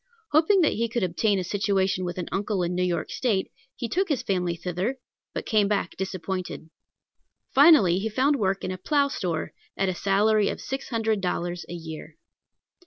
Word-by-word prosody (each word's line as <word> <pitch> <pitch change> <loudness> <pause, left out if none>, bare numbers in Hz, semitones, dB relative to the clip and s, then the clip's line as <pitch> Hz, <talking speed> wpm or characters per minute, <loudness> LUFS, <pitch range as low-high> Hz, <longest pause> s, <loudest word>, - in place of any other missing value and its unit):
Hoping 320 +6 +4
that 310 - +3
he 230 +1 -1
could 235 -2 -1
obtain 195 +4 +1
a 185 - -1
situation 195 -1 0
with 175 0 -4
an 180 - -3
uncle 195 -1 -1
in 175 +1 -1
New 180 - -1
York 180 -2 -1
State, 210 -7 0 0.2
he 235 - -4
took 375 - 0
his 285 -5 0
family 180 -3 0
thither, 180 +9 -3 0.3
but - - -5
came 215 -3 +3
back 205 -1 -1
disappointed. 185 -3 -4 0.8
Finally 265 - +6
he 220 +3 -2
found 270 +6 +2
work 195 -4 0
in - - -2
a 185 - -5
plow 285 - +2
store 170 - -3 0.2
at 195 -1 +1
a - - 0
salary 205 +3 +2
of - - -4
six 270 +1 -5
hundred 225 -4 0
dollars 175 -1 -2
a - - -5
year. 160 -1 -8
195 Hz, 185 wpm, -26 LUFS, 180-230 Hz, 0.8 s, Finally